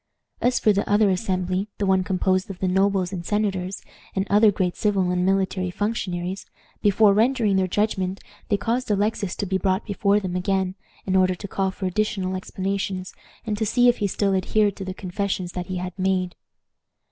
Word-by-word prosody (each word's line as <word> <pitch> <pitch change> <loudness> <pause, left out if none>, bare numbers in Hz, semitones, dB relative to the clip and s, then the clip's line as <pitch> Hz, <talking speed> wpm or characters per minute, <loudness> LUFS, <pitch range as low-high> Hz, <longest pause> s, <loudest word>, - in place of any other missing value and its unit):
As 250 +1 +2
for 215 - +4
the 200 - -1
other 205 -1 +4
assembly, 185 0 -1
the 205 - -1
one 190 -1 +3
composed 185 +2 0
of 195 - -6
the 190 - -1
nobles 190 0 +1
and 175 -2 -4
senators, 195 -2 -1 0.3
and 190 0 0
other 210 +1 +6
great 180 -3 -1
civil 195 -4 +1
and 180 0 +1
military 190 -1 +1
functionaries, 190 -2 -3 0.3
before 205 0 +5
rendering 225 -1 +2
their 190 -1 +2
judgment 195 -1 -1 0.3
they 205 - +3
caused 240 +4 -1
Alexis 205 -2 0
to 205 - -3
be 190 0 0
brought 190 +1 0
before 200 0 +2
them 185 -3 -4
again, 190 0 0 0.3
in 190 - 0
order 185 -1 +3
to 200 - -7
call 195 0 -1
for 190 +1 -5
additional 190 -1 -1
explanations, 190 0 -3 0.3
and 210 -2 -2
to 220 - +1
see 245 +3 +4
if 240 - +2
he 205 - 0
still 195 0 0
adhered 200 +2 +2
to 195 - -5
the 185 0 -5
confessions 185 -1 -3
that 180 -1 -5
he 185 - -4
had 180 0 -4
made. 185 -1 0
195 Hz, 190 wpm, -24 LUFS, 185-205 Hz, 0.3 s, other